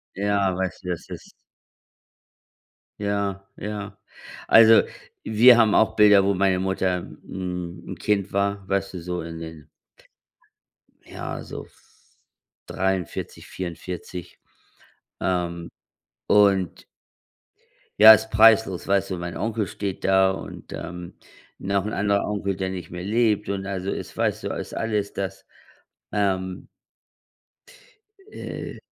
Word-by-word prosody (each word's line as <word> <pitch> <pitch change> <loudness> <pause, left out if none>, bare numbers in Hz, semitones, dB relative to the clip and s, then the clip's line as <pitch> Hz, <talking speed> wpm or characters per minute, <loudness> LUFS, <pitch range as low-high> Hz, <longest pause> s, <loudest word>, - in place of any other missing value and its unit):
Ja, 100 -2 +1
weißt 95 -1 -4
du, 90 - -6
das 90 -2 -4
ist - - -9 1.7
Ja, 100 -1 -2
ja. 105 -1 -6 0.5
Also, 115 0 +8 0.4
wir 115 +3 +6
haben 110 -3 +4
auch 110 0 +3
Bilder, 105 -2 +6
wo 100 - +2
meine 95 -1 +2
Mutter 95 -1 0
'n 90 -1 -7
'n - - -5
Kind 100 -2 -1
war, 100 0 -1
weißt 95 0 -1
du, 90 - -5
so 90 +1 -4
in 80 0 -7
den 80 -2 -10 1.4
ja, - - -6
so - - -8
v - - -26 0.8
43, 95 -3 -3
44, 90 -1 -7 0.8
ähm, 85 -2 -2 0.6
und 100 -4 +3 1.2
Ja, 110 +1 +12
ist 110 0 0
preislos. 110 -4 +4
Weißt 100 0 +1
du, 95 - -3
mein 85 0 -5
Onkel 110 -3 -2
steht 100 0 -5
da 95 0 +4
und, 95 - -8
ähm, 85 +1 -7 0.4
noch 100 0 -1
‘n 105 - -3
anderer 100 0 +1
Onkel, 100 -2 -2
der 95 0 -3
nicht 95 -2 -7
mehr 90 +1 -6
lebt 105 -1 +1
und 95 -1 -3
also 95 0 -3
es - - -6
weißt - - -1
du, - - -1
ist - - -6
alles, 105 -3 -2
dass, 95 -1 -5 0.7
ähm 95 -2 -1 1.6
äh, - - -7
95 Hz, 125 wpm, -24 LUFS, 90-105 Hz, 1.7 s, Ja